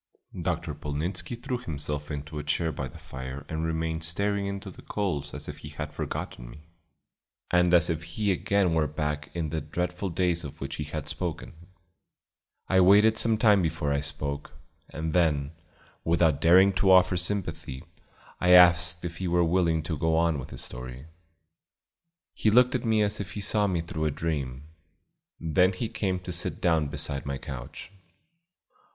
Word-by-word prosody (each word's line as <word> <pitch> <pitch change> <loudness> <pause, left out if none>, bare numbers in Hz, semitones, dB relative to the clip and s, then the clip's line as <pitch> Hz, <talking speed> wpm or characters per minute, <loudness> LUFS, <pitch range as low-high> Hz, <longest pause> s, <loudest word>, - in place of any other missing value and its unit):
Dr. - - -2
Polnitzski 75 - -3
threw 125 -1 -3
himself 75 - -5
into 75 +1 -5
a - - -5
chair 80 +2 0
by 70 -2 -4
the - - -12
fire 65 +2 -8
and 80 0 -3
remained 80 0 -2
staring 100 +4 -1
into 100 0 -5
the - - -14
coals 75 -9 -2
as 75 0 -8
if - - -7
he - - -9
had - - -6
forgotten - - -5
me, - - -12 0.9
and 90 -1 +4
as 85 -1 +5
if 80 -2 -1
he 95 +5 -1
again 95 -1 +1
were 80 -2 +2
back 75 0 -3
in 80 -3 -2
the 80 -1 -2
dreadful 90 +5 -3
days 85 0 0
of 70 - -8
which 70 - -5
he 75 - -3
had 75 -1 -5
spoken. 85 +1 -4 1.1
I 95 -1 +4
waited 105 +4 +6
some 110 -1 +2
time 105 -3 +5
before 80 -3 -1
I 70 - +1
spoke, 70 -1 -4 0.4
and 80 0 -4
then, 75 -5 +2 0.5
without 80 -3 +2
daring 95 +4 +6
to 95 +1 +3
offer 95 0 +6
sympathy, 90 -7 -2 0.6
I 90 0 +4
asked 90 -1 +6
if 85 -1 -5
he 95 - -3
were 85 0 +3
willing 85 -2 +2
to 80 0 -3
go 80 0 +2
on 85 -3 +2
with 65 - -8
his - - -7
story. 65 +2 -7 1.3
He 110 - +1
looked 125 +3 +5
at 125 - -1
me 110 -2 +3
as 105 0 -1
if 100 -2 -5
he - - -5
saw 105 0 +2
me 90 -3 0
through 80 -1 -4
a - - +2
dream; 70 -4 -3 0.8
then 90 +4 +3
he 110 +5 -3
came 95 -5 -1
to 90 - -6
sit - - +1
down 80 -4 +2
beside 70 0 -2
my 70 -1 -2
couch. 65 +7 -8
85 Hz, 175 wpm, -27 LUFS, 75-95 Hz, 1.3 s, waited